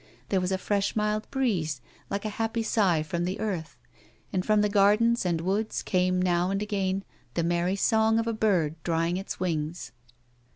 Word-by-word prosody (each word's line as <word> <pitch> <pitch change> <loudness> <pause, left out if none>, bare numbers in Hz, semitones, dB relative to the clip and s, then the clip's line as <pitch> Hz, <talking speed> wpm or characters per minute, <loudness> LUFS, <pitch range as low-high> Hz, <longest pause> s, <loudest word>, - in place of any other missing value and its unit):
There 190 -2 +2
was 180 +1 -1
a 190 - +1
fresh 200 +1 -1
mild 210 0 0
breeze 185 - 0 0.3
like 200 +1 -3
a - - 0
happy 225 +2 -2
sigh 190 -8 +2
from 170 +2 -2
the 185 +2 -2
earth, 180 - -3 0.6
and 185 - +1
from 215 +1 +3
the 210 - +3
gardens 210 +2 +3
and 170 -2 +1
woods 200 +5 -1
came 185 0 +1
now 180 0 +2
and 195 0 0
again 195 -2 -1 0.3
the 170 - +1
merry 175 +2 +1
song 220 +2 +3
of 230 - +1
a 230 - -1
bird 175 -8 +1
drying 165 +1 0
his 195 - -5
wings. 165 -2 -2
190 Hz, 180 wpm, -27 LUFS, 175-215 Hz, 0.6 s, from